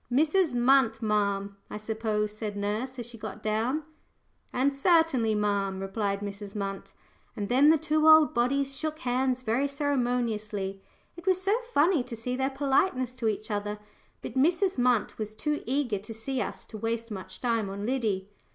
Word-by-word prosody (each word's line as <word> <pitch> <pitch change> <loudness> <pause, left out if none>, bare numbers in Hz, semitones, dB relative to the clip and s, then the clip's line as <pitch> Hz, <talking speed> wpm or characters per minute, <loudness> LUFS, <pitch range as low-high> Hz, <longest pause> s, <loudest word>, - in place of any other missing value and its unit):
"Mrs. 310 +2 +3
Munt, 240 -2 +3
ma'am, 200 -2 0
I - - -5
suppose?" 215 -1 -2
said 215 -2 -4
nurse 215 +6 -2
as 240 - -5
she 235 -1 -11
got 215 0 -7
down. 230 +8 0 0.7
And, 275 +3 +1
"Certainly, 275 -8 +3
ma'am," 200 -2 0
replied 200 +1 -2
Mrs. 200 0 -6
Munt, 195 -1 -4 0.4
and 205 -3 -4
then 270 +5 +6
the 320 - +6
two 310 0 +2
old 315 -1 +7
bodies 275 +3 +1
shook 310 +2 -3
hands 255 0 0
very 250 +5 +1
ceremoniously. 240 -8 -1 0.3
It 345 +1 -12
was 370 -1 +4
so 395 +3 +2 0.2
funny 325 - +4
to 245 -2 -6
see 250 +3 -3
their 265 +1 0
politeness 270 -2 +1
to 230 -3 -1
each 215 +1 -2
other. 205 0 -2 0.5
But - - -6
Mrs. 340 +5 +2
Munt 245 -4 +2
was 215 0 -4
too 300 +6 -1
eager 255 -6 0
to 215 +3 -9
see 255 +4 -3
us - - -5
to 215 - -9
waste 230 +1 -2
much 190 -3 -7
time 230 -5 0
on 200 +1 -5
Liddy. 215 -7 -1
235 Hz, 170 wpm, -28 LUFS, 210-275 Hz, 0.7 s, old